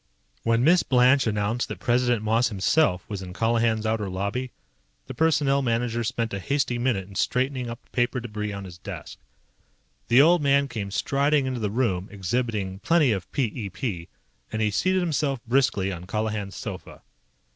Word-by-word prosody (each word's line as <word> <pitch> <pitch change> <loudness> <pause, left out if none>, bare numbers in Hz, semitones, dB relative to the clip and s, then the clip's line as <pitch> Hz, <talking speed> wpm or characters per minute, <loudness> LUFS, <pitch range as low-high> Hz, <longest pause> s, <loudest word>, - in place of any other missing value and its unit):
When 115 +1 +2
Miss 170 +5 +5
Blanche 130 0 +4
announced 105 +3 -1
that - - -6
President 120 -2 +1
Moss 115 +3 +2
himself 95 - +1
was 100 -3 -5
in 90 -1 -8
Colihan's 115 0 +1
outer 110 -2 -1
lobby, 100 +8 -3 0.6
the - - -7
Personnel 145 -4 +2
Manager 120 -1 0
spent 115 0 -2
a 100 - -2
hasty 135 +1 -1
minute 115 -7 0
in 100 - -13
straightening 125 +4 -1
up 115 - -8
the - - -34
paper 120 +1 0
debris 105 -3 -4
on 100 0 -6
his 90 -2 -10
desk. - - -8 0.9
The 120 - +5
old 165 +4 +6
man 140 0 +3
came 110 -6 -5
striding 140 +7 +1
into 130 -2 -2
the 105 -2 -1
room, 100 -5 0
exhibiting 100 -1 -2
plenty 155 +3 +3
of 95 -4 -3
p 140 - 0
e 110 -3 -3
p, 95 -5 -4 0.4
and 110 - -3
he 105 -1 +1
seated 185 - +1
himself 145 -5 0
briskly 120 -6 +1
on 90 0 -7
Colihan's 105 -2 -3
sofa. - - -8
115 Hz, 175 wpm, -25 LUFS, 100-130 Hz, 0.9 s, old